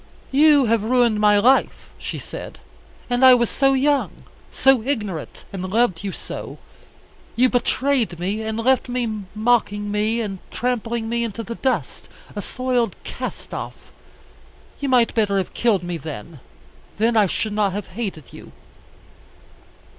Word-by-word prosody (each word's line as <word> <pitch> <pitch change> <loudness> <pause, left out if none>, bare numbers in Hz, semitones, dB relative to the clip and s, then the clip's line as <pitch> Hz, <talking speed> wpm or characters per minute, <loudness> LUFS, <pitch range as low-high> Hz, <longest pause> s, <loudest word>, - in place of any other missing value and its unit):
"You 290 0 +5
have 225 -2 +2
ruined 235 -2 +2
my 210 -1 +5
life," 255 +6 +2
she - - -5
said; - - -8 0.5
"and 245 +1 0
I 260 -1 +9
was 235 -2 +1
so 270 -1 +3
young, 280 +1 0 0.3
so 270 -3 +4
ignorant, 210 - -4
and 190 - -4
loved 205 -4 +1
you 200 - -3
so. - - -7 0.8
You 255 +2 +4
betrayed 250 -4 +1
me, 195 +5 -2
and 220 0 -3
left 255 +2 +2
me, 245 -1 -1 0.3
mocking 210 -2 +1
me 215 +3 0
and 200 -4 -4
trampling 235 -2 -2
me 235 +1 -1
into 230 0 -4
the 230 - -5
dust, 260 +2 -2 0.3
a - - -3
soiled 250 -5 -1
cast - - -7
off. - - -7 0.9
You 280 - -2
might 245 -3 +3
better 205 -3 +1
have 190 - -2
killed 215 -7 +1
me 175 -1 -3
then. 155 -1 -8 0.6
Then 225 +3 +2
I 210 -3 +5
should 215 +4 -2
not 205 -2 +1
have 205 -1 -5
hated 195 - -6
you." - - -12
230 Hz, 150 wpm, -22 LUFS, 205-250 Hz, 0.9 s, I